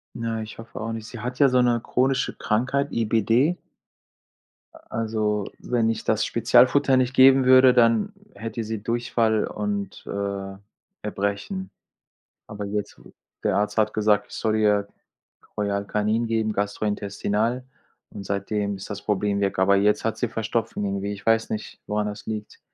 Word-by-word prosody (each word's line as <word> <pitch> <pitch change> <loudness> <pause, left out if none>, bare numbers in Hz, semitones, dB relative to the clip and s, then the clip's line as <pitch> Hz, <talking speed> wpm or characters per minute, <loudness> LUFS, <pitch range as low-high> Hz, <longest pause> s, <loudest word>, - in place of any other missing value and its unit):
Na, 115 -1 -3
ich 110 +1 -10
hoffe 115 - -9
auch 115 +1 -3
nicht. 115 0 -6
Sie 120 - -9
hat 125 +2 -5
ja 140 -2 +6
so 125 0 +3
'ne 120 -2 +2
chronische 135 +1 +1
Krankheit, 130 +6 0
IBD. 115 - +2 1.2
A - - -15
also, 110 -2 -1
wenn 115 -2 0
ich 115 - -2
das 110 -1 +1
Spezialfutter 130 +3 +4
nicht 130 0 +1
geben 130 0 +6
würde, 130 0 +7
dann 115 - +3 0.2
hätte 115 +1 -5
sie 110 -1 -4
Durchfall 115 -2 +1
und, 205 -1 -4
äh, 100 -1 -4 0.5
Erbrechen. 100 - -3 0.8
Aber 105 -1 -6
jetzt 105 0 -4 0.4
der - - +1
Arzt 105 +2 -1
hat 110 -1 +2
gesagt, 105 -1 +2
ich - - -13
soll 110 -1 0
ihr 105 -1 +2 0.7
Royal 100 -1 -1
Canin 105 +3 0
geben, 110 -1 0
gastrointestinal, 105 +3 -1 0.5
und 100 - -8
seitdem 100 +1 -2
ist 95 - -9
das 100 0 -5
Problem 105 -1 0
weg. 100 -1 0
Aber 100 +1 +4
jetzt 105 +1 +2
hat 115 - -1
sie 120 - 0
Verstopfung, 115 -2 -2
irgendwie. 100 +1 -2
Ich 100 - -11
weiß 115 0 +2
nicht, 105 -1 -5
woran 105 0 -1
das 105 0 -7
liegt. 105 -1 -6
110 Hz, 160 wpm, -24 LUFS, 105-120 Hz, 1.2 s, würde